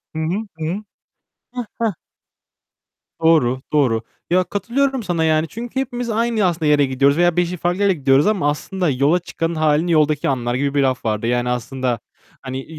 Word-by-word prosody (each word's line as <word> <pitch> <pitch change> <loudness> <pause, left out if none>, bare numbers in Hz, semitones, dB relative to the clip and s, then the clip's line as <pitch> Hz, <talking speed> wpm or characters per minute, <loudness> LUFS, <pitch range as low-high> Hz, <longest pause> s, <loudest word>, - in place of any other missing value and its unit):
Hı - - -2
hı. 160 - -1 0.3
Hı 160 - -4
hı. 190 +6 -3 0.7
Hah, 245 -2 -4
hah. 225 -4 0 1.3
Doğru. 130 -6 +3
Doğru. 125 -7 +2 0.3
Ya 185 +1 +3
katılıyorum 240 +7 -1
sana 170 -4 0
yani 155 0 +2
çünkü 235 +7 -5
hepimiz 245 -2 -3
aynı 230 0 +1
aslında 170 -3 0
yere 150 -1 +4
gidiyoruz 140 +3 +2
veya 175 0 +3
5'i 175 0 0
farklı 175 +4 -1
yere 200 -1 +4
gidiyoruz 140 -1 +3
ama 195 -8 +2
aslında 180 +4 -2
yola 140 +6 +2 0.4
hâlini 155 +2 +2
yoldaki 150 -2 +2
anlar 120 -2 -1
gibi 140 +2 -1
bir 145 - +2
laf 130 -2 -1
vardı. 110 +1 -1
Yani 120 0 0
aslında 125 0 -2 0.4
hani 130 0 -6
155 Hz, 170 wpm, -20 LUFS, 135-190 Hz, 1.3 s, yere